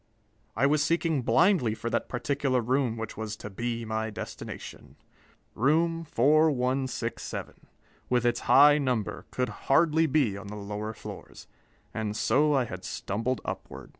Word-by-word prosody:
I - - +2
was 145 +1 +3
seeking 165 -2 +1
blindly 125 - +3
for 115 +1 -4
that - - -1
particular 135 +1 0
room 125 0 0
which 115 -1 -5
was 110 -1 -5
to 105 - -9
be 115 +3 -3
my 110 0 -2
destination. 105 - -8 0.6
Room 165 +6 +1
4167, 130 -4 0 0.4
with 125 -1 +2
its 120 0 +2
high 145 +2 +7
number, 125 -7 -2
could 125 0 -1 0.2
hardly 160 +3 +4
be 135 -8 +2
on 100 +1 -9
the 105 - -7
lower 105 +1 -5
floors, - - -10 0.5
and 105 -1 -3
so 150 +6 +3
I 130 -2 +2
had 95 -5 -8
stumbled 115 +5 -3
upward.... - - -7
125 Hz, 140 wpm, -28 LUFS, 110-145 Hz, 0.6 s, high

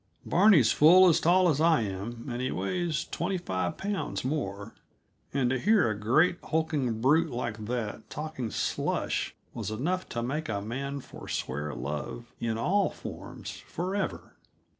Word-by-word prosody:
Barney's 175 - +5
full 180 +5 +7
as 165 0 +4
tall 180 +3 +4
as 155 -3 +2
I 165 -3 +4
am, 110 +4 -5
and 120 -1 -3
he 130 - 0
weighs 160 - -1
twenty 185 +3 -2
five 95 - -2
pounds 200 -8 -3
more; 110 -7 -3 0.6
and 130 -3 +1
to 130 - 0
hear 210 - +4
a - - -2
great, 140 - +3
hulking 150 -8 0
brute 155 +6 +4
like 115 -4 -4
that 115 -2 -4
talking 150 -6 -4
slush - - -1 0.2
was - - -4
enough 165 +12 -2
to 120 - -3
make 150 +4 -3
a 100 -2 -1
man 135 +7 -4
forswear 75 - -5
love 75 - -5
in 115 -1 -1
all 195 - +2
forms - - -8
forever. 190 +3 -4
135 Hz, 150 wpm, -29 LUFS, 110-170 Hz, 0.6 s, full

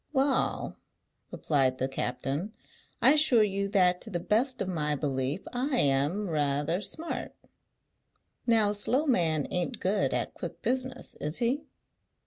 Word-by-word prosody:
"Wa'al," 270 -1 0 0.5
replied 135 -4 0
the 130 - -1
captain, 135 - -3 0.5
"I 270 - +8
assure 290 -7 +5
you 200 -1 -1
that 180 -3 +3
to - - -5
the 175 -4 -2
best 240 +8 +1
of 195 - 0
my 150 -5 -1
belief 135 +3 -2
I 255 +2 0
am 145 - +1
ra'ather 150 +2 0
smart. 315 - -4 1.1
Now 220 -3 +4
a - - -2
slow 255 +8 +1
man 165 - +1
ain't 180 -1 -2
good 200 +2 +1
at - - -2
quick - - -8
business, 260 0 0
is 150 +2 -2
he?" 255 +5 0
195 Hz, 140 wpm, -29 LUFS, 150-245 Hz, 1.1 s, I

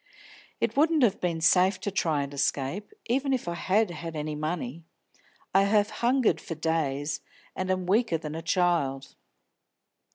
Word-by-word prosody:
It - - 0
wouldn't 310 0 +3
have 215 -5 +2
been 170 -2 -1
safe 185 +3 +4
to 205 - -2
try 160 -6 +1
and 140 0 -7
escape, 140 - -1
even 270 +3 0
if 250 -8 -2
I 170 - -1
had 190 +4 +1
had 165 0 -6
any 150 0 -3
money. 155 -1 -4 0.7
I 195 +1 +5
have 205 0 +2
hungered 250 0 +2
for 165 - -6
days, 150 -2 -1 0.3
and 185 0 -3
I - - +4
am 185 -1 -3
weaker 200 -1 +2
than 155 -1 -6
a 165 - -4
child." 165 -6 0
175 Hz, 165 wpm, -27 LUFS, 155-205 Hz, 0.7 s, I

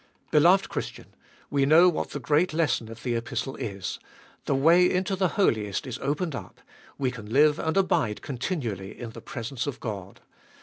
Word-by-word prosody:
Beloved 175 +6 +5
Christian, - - -6 0.4
we 140 -1 +2
know 160 +6 +7
what 175 - 0
the 145 - -5
great 155 +5 +2
lesson 140 -8 0
of 115 0 -10
the 120 - -1
Epistle 120 +3 -3
is: 100 -3 -5 0.5
the 140 - +1
way 170 +6 +5
into 185 +2 0
the 190 +2 -1
Holiest 110 - +1
is 130 -1 -5
opened 150 +4 -2
up, 100 -8 -8 0.4
we 130 -3 0
can 110 -4 -9
live 150 +3 +4
and 160 +4 -1
abide 120 - +1
continually 120 - -4
in 120 -2 -6
the - - -10
presence 120 +3 -5
of 135 -2 -4
God. 100 -4 -6
135 Hz, 175 wpm, -26 LUFS, 115-165 Hz, 0.5 s, know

